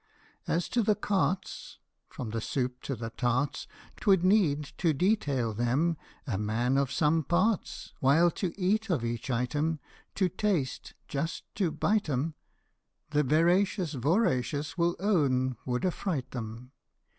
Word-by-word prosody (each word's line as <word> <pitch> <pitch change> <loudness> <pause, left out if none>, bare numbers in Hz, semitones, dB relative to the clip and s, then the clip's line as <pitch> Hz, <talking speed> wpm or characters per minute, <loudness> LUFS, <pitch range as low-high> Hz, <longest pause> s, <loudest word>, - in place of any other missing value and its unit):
As 170 +1 0
to 240 - +2
the 210 -1 +3
cartes, 190 -4 -1 0.3
From 115 -4 -6
the 115 0 -2
soups 125 +1 -3
to 135 - -1
the 115 0 -6
tarts, 125 +4 -1 0.3
'T - - -11
would 190 -3 +5
need 185 -7 +3 0.2
to 165 -3 +3
detail 140 - +1
them 130 +10 +1 0.3
a 110 -9 -2
man 115 +5 0
of 140 -1 +1
some 155 +2 +2
parts; 185 +6 0
While 160 +6 +4
to 180 +1 -2
eat 210 +4 +1
of 145 -10 0
each 115 +2 -3
item 145 +6 0 0.4
To 190 - +2
taste 180 -7 -2
just 150 +4 -3
to 190 -5 +1
bite 205 +2 0
'em, 145 +4 -1 0.8
The 150 0 +3
veracious 170 - +2
voracious 145 - 0
will 170 0 +1
own 135 - +2
would 125 +6 0
affright 165 -8 -2
'em. 115 +2 -6
150 Hz, 145 wpm, -29 LUFS, 125-185 Hz, 0.8 s, would